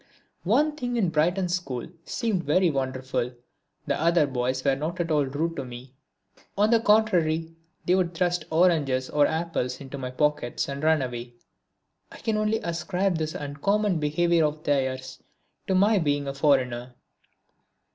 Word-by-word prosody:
One 300 Hz, 0 st, +2 dB
thing 245 Hz, -4 st, -3 dB
in 225 Hz, -, +2 dB
the 180 Hz, -, +2 dB
Brighton 175 Hz, +4 st, +1 dB
school 175 Hz, -9 st, -3 dB, 0.2 s
seemed 220 Hz, -8 st, -1 dB
very 170 Hz, +3 st, +3 dB
wonderful: 130 Hz, -2 st, -2 dB, 0.5 s
the -, -, -1 dB
other 170 Hz, -1 st, +4 dB
boys 130 Hz, -1 st, -2 dB
were 135 Hz, -1 st, +3 dB
not 155 Hz, +6 st, -4 dB
at 170 Hz, -1 st, -1 dB
all 145 Hz, -3 st, +2 dB
rude 160 Hz, +5 st, -2 dB
to 135 Hz, -, -2 dB
me. 125 Hz, +1 st, -10 dB, 0.6 s
On 210 Hz, +2 st, +3 dB
the 230 Hz, -, +5 dB
contrary 175 Hz, -7 st, +2 dB, 0.3 s
they 180 Hz, -, +3 dB
would 185 Hz, -1 st, +3 dB
often 170 Hz, -, -15 dB
thrust 175 Hz, -2 st, 0 dB
oranges 155 Hz, -6 st, +2 dB
and 145 Hz, -1 st, +3 dB
apples 160 Hz, -6 st, -2 dB
into 140 Hz, 0 st, -8 dB
my 130 Hz, -1 st, -4 dB
pockets 150 Hz, -2 st, 0 dB
and 140 Hz, 0 st, -5 dB
run 160 Hz, -3 st, +3 dB
away. 120 Hz, -1 st, -6 dB, 0.8 s
I -, -, -11 dB
can 220 Hz, -1 st, -1 dB
only 215 Hz, +1 st, +1 dB
ascribe 180 Hz, +1 st, -1 dB
this 155 Hz, 0 st, -3 dB
uncommon 180 Hz, +7 st, 0 dB
behaviour 165 Hz, +3 st, +2 dB
of 150 Hz, 0 st, -1 dB
theirs 130 Hz, -3 st, -1 dB, 0.5 s
to 190 Hz, -, +1 dB
my 205 Hz, +2 st, +4 dB
being 145 Hz, -3 st, 0 dB
a 135 Hz, -, -2 dB
foreigner. 130 Hz, -4 st, +1 dB
155 Hz, 165 wpm, -26 LUFS, 135-180 Hz, 0.8 s, the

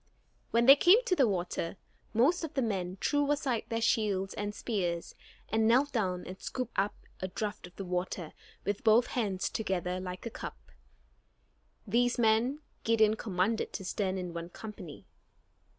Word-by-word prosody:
When 235 Hz, +1 st, +3 dB
they 275 Hz, +2 st, +11 dB
came 380 Hz, -, +6 dB
to 370 Hz, -, +2 dB
the 270 Hz, -7 st, +4 dB
water, 180 Hz, -2 st, -2 dB, 0.3 s
most 295 Hz, +11 st, +3 dB
of 320 Hz, -1 st, -5 dB
the 265 Hz, -, +2 dB
men 190 Hz, -4 st, -2 dB
threw 290 Hz, -1 st, +1 dB
aside 275 Hz, -6 st, 0 dB
their 230 Hz, 0 st, -1 dB
shields 200 Hz, -4 st, +1 dB
and 205 Hz, 0 st, -4 dB
spears, 175 Hz, -7 st, -2 dB, 0.3 s
and 220 Hz, 0 st, +2 dB
knelt 260 Hz, +5 st, +4 dB
down 185 Hz, -6 st, -1 dB
and 185 Hz, +1 st, -9 dB
scooped 255 Hz, -2 st, -4 dB
up 200 Hz, +1 st, +1 dB, 0.2 s
a 185 Hz, -, -2 dB
draft 205 Hz, 0 st, -4 dB
of 180 Hz, -, -19 dB
the 195 Hz, -, -6 dB
water 180 Hz, -2 st, -3 dB, 0.3 s
with 205 Hz, 0 st, -2 dB
both 230 Hz, +2 st, +6 dB
hands 200 Hz, -6 st, -1 dB
together 185 Hz, -4 st, -2 dB
like 180 Hz, +1 st, -6 dB
a 230 Hz, -, -4 dB
cup. -, -, -7 dB, 1.3 s
These 245 Hz, +1 st, +2 dB
men 240 Hz, +5 st, +2 dB, 0.2 s
Gideon 220 Hz, -1 st, +4 dB
commanded 210 Hz, +1 st, -1 dB
to 190 Hz, -, -5 dB
stand 190 Hz, 0 st, -1 dB
in 180 Hz, -2 st, -4 dB
one 170 Hz, 0 st, -5 dB
company. 190 Hz, -6 st, -9 dB
215 Hz, 165 wpm, -31 LUFS, 185-235 Hz, 1.3 s, they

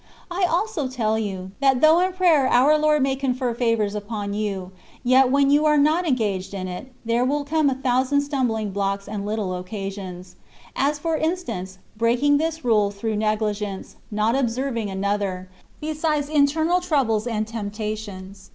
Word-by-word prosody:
I 360 Hz, +1 st, +1 dB
also 345 Hz, -5 st, 0 dB
tell 220 Hz, -4 st, 0 dB
you, 190 Hz, -3 st, -4 dB
that 270 Hz, -2 st, +3 dB
though 315 Hz, +4 st, +6 dB
in 370 Hz, +1 st, +1 dB
prayer 340 Hz, -7 st, +4 dB
our 265 Hz, +6 st, +5 dB
Lord 300 Hz, -2 st, +3 dB
may 270 Hz, 0 st, +1 dB
confer 255 Hz, -2 st, -1 dB
favours 230 Hz, -4 st, 0 dB
upon 205 Hz, -1 st, -4 dB
you, 200 Hz, -3 st, -3 dB, 0.3 s
yet 255 Hz, +1 st, +5 dB
when 280 Hz, +1 st, +3 dB
you 295 Hz, +1 st, +4 dB
are 300 Hz, 0 st, +4 dB
not 310 Hz, +5 st, +3 dB
engaged 205 Hz, -8 st, -1 dB
in 185 Hz, -1 st, -4 dB
it, 185 Hz, +9 st, -7 dB
there 230 Hz, +2 st, +1 dB
will 285 Hz, +3 st, 0 dB
come 305 Hz, 0 st, +2 dB
a 265 Hz, -, -1 dB
thousand 260 Hz, +2 st, +1 dB
stumbling 245 Hz, -7 st, -1 dB
blocks 200 Hz, 0 st, -2 dB
and 205 Hz, -1 st, -4 dB
little 210 Hz, -3 st, -2 dB
occasions; 185 Hz, -1 st, -7 dB, 0.4 s
as, 285 Hz, +2 st, +1 dB
for 320 Hz, +1 st, -1 dB
instance, 315 Hz, -, -3 dB, 0.2 s
breaking 245 Hz, +6 st, +3 dB
this 320 Hz, -2 st, -2 dB
rule 210 Hz, -4 st, +3 dB
through 210 Hz, +2 st, -3 dB
negligence, 210 Hz, -2 st, -2 dB
not 215 Hz, +2 st, +1 dB
observing 245 Hz, -3 st, -1 dB
another, 195 Hz, -1 st, -2 dB, 0.3 s
besides 305 Hz, -1 st, -1 dB
internal 310 Hz, +4 st, +2 dB
troubles 255 Hz, -10 st, +1 dB
and 215 Hz, -2 st, -1 dB
temptations. 210 Hz, -3 st, -6 dB
235 Hz, 160 wpm, -23 LUFS, 205-285 Hz, 0.4 s, though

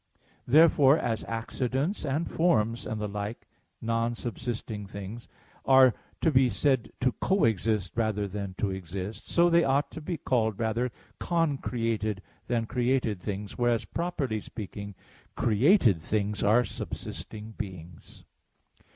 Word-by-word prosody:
Therefore, 145 Hz, 0 st, +6 dB
as 115 Hz, -7 st, -1 dB
accidents 130 Hz, -, -2 dB
and 145 Hz, +4 st, -1 dB
forms 115 Hz, -9 st, +1 dB
and 110 Hz, -, -3 dB
the 105 Hz, -, -2 dB
like 105 Hz, +2 st, -5 dB, 0.4 s
non 115 Hz, +1 st, 0 dB
subsisting 115 Hz, -3 st, -5 dB
things 100 Hz, +4 st, -8 dB, 0.4 s
are 130 Hz, -2 st, +6 dB, 0.3 s
to 160 Hz, -, +3 dB
be 130 Hz, -2 st, +4 dB
said 120 Hz, +2 st, +1 dB
to 130 Hz, 0 st, +3 dB
co 195 Hz, +8 st, +1 dB
exist 110 Hz, -3 st, +1 dB
rather 110 Hz, -3 st, 0 dB
than 100 Hz, -1 st, -5 dB
to 100 Hz, -, 0 dB
exist, 95 Hz, +3 st, -6 dB
so 170 Hz, 0 st, +4 dB
they 170 Hz, 0 st, +4 dB
ought 140 Hz, +2 st, +1 dB
to 160 Hz, -, -8 dB
be 170 Hz, +2 st, -3 dB
called 110 Hz, -7 st, 0 dB
rather 115 Hz, +3 st, 0 dB, 0.3 s
"concreated" 115 Hz, -, -1 dB, 0.2 s
than 115 Hz, -2 st, 0 dB
"created" 120 Hz, -4 st, 0 dB
things; 100 Hz, +2 st, -5 dB
whereas, 120 Hz, -1 st, +2 dB
properly 145 Hz, -11 st, -2 dB
speaking, 100 Hz, -2 st, -7 dB, 0.4 s
created 115 Hz, -, +4 dB
things 105 Hz, +3 st, -1 dB
are 110 Hz, +4 st, +4 dB
subsisting 110 Hz, 0 st, -7 dB
beings. 90 Hz, -6 st, -9 dB
115 Hz, 130 wpm, -28 LUFS, 105-130 Hz, 0.4 s, Therefore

